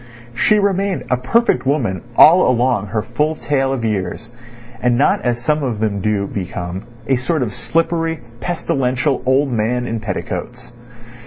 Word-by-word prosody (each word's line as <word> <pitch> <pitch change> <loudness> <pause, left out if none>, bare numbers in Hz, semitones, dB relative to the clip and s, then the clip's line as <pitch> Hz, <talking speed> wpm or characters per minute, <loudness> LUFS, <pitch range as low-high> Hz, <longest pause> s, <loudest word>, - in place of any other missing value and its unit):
She 210 - +3
remained 200 -1 0
a 125 - +3
perfect 130 - +1
woman 120 -10 0
all 175 +8 +7
along 120 -4 +1
her 105 +2 -2
full 150 +6 -1
tale 135 -3 0
of 125 -4 -2
years, 105 +2 -3 0.5
and 120 -1 +2
not 140 - +3
as 120 -1 -1
some 150 +5 0
of 120 -6 -2
them 105 -2 -1
do 105 -1 0
become—a 100 +7 -4
sort 140 +3 0
of 110 - -4
slippery, 165 -1 -1 0.2
pestilential 135 -5 -1
old 135 +1 +3
man 120 +2 0
in 115 -1 -3
petticoats. 105 +3 -5
125 Hz, 150 wpm, -18 LUFS, 110-150 Hz, 0.5 s, all